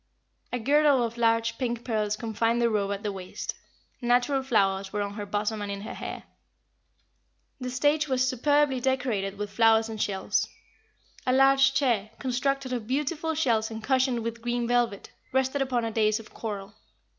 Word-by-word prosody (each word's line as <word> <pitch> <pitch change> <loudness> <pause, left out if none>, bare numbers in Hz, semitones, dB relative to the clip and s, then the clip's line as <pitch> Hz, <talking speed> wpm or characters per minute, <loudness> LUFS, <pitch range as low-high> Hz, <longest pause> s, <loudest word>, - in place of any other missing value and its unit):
A 245 - -1
girdle 280 +1 +4
of 230 0 -3
large 230 -1 +1
pink 240 -2 -2
pearls 215 -3 0
confined 225 +1 0
the 235 -1 +2
robe 200 -2 0
at 200 +1 -4
the 210 - -1
waist. 185 -2 -6 0.5
Natural 245 +3 +2
flowers 195 -6 +1
were 205 0 -1
on 200 0 -5
her 205 -1 -6
bosom 210 +1 -1
and 205 -1 -3
in 200 0 -5
her 215 - -6
hair. - - -6 1.4
The 250 -1 -4
stage 295 +4 +2
was 260 -1 +1
superbly 280 +1 +2
decorated 240 -7 -1
with 205 0 -4
flowers 225 +1 +4
and 220 -1 -4
shells. 190 -2 0 0.8
A - - +4
large 270 +1 +5
chair, 230 -7 +1
constructed 265 +1 -1
of 235 -4 -3
beautiful 300 +4 -1
shells 230 -8 +1
and 220 -1 -7
cushioned 260 -2 +1
with 230 0 -4
green 240 0 -1
velvet, 240 -4 0 0.2
rested 265 +1 +1
upon 250 -3 0
a 225 - -2
dais 215 -1 +2
of 220 - -13
coral. 205 -3 -6
235 Hz, 170 wpm, -27 LUFS, 215-260 Hz, 1.4 s, large